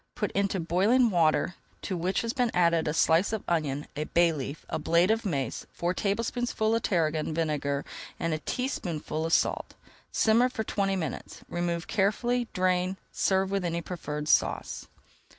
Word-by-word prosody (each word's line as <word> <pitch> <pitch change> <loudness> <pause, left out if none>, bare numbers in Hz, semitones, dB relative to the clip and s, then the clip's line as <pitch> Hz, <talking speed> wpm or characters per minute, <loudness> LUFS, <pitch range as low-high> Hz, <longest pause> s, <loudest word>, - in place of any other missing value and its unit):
Put 210 -4 -2
into 200 -1 0
boiling 205 +9 +3
water 170 0 +2 0.3
to 190 - -2
which 180 +3 0
has 230 0 -2
been 250 -3 +1
added 170 -2 +3
a - - +1
slice 165 +5 +3
of 220 -2 -2
onion, 150 -4 0
a 150 +1 -2
bay 170 0 +3
leaf, 140 0 -6
a - - -3
blade 170 +4 +3
of 225 0 0
mace, 135 -9 -2
four 175 +1 -1
tablespoonfuls 220 +2 0
of - - -3
tarragon 155 -3 0
vinegar, 150 -3 -1 0.3
and 165 -1 0
a 155 - -1
teaspoonful 165 - -3
of 165 - -2
salt. - - +1 0.4
Simmer 230 +3 +4
for 225 -3 -3
twenty 195 -2 0
minutes, 170 -4 -5
remove 175 -1 -2
carefully, 235 +4 +1
drain, 185 -1 +1
and 190 - -6
serve 190 0 +1
with 195 -1 0
any 170 -1 -1
preferred 150 -4 -5
sauce. - - +1
180 Hz, 170 wpm, -28 LUFS, 160-210 Hz, 0.4 s, Simmer